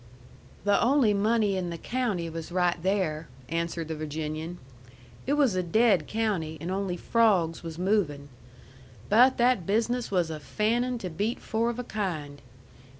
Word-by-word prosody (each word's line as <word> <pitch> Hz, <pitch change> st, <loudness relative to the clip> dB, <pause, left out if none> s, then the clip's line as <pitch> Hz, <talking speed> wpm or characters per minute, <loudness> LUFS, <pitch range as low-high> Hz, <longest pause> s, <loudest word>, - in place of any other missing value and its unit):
"The 205 Hz, 0 st, +3 dB
only 255 Hz, -4 st, +4 dB
money 210 Hz, 0 st, +2 dB
in 180 Hz, -2 st, -2 dB
the 170 Hz, -, -5 dB
county 215 Hz, -5 st, -2 dB
was 165 Hz, 0 st, -6 dB
right 180 Hz, -1 st, +2 dB
there," 175 Hz, -5 st, 0 dB, 0.2 s
answered 165 Hz, 0 st, -2 dB
the 160 Hz, -, -3 dB
Virginian. 155 Hz, +2 st, -4 dB, 0.7 s
"It 280 Hz, -, +2 dB
was 285 Hz, -7 st, +3 dB
a 185 Hz, -, +1 dB
dead 190 Hz, -2 st, +3 dB
county, 195 Hz, -8 st, -1 dB
and 170 Hz, +4 st, -4 dB
only 190 Hz, -2 st, -2 dB
frawgs 190 Hz, -7 st, +2 dB
was 165 Hz, -1 st, -7 dB
movin'. 175 Hz, -7 st, 0 dB, 0.8 s
But 250 Hz, +5 st, +5 dB
that 240 Hz, -7 st, +2 dB
business 230 Hz, +4 st, 0 dB
was 175 Hz, -4 st, 0 dB
a 155 Hz, -, -5 dB
fannin' 230 Hz, -, 0 dB
to 185 Hz, -6 st, -5 dB
beat 205 Hz, +9 st, -2 dB
four 225 Hz, +2 st, -1 dB
of 240 Hz, -, -4 dB
a 250 Hz, -, -3 dB
kind. 165 Hz, -11 st, -4 dB
190 Hz, 155 wpm, -27 LUFS, 165-225 Hz, 0.8 s, But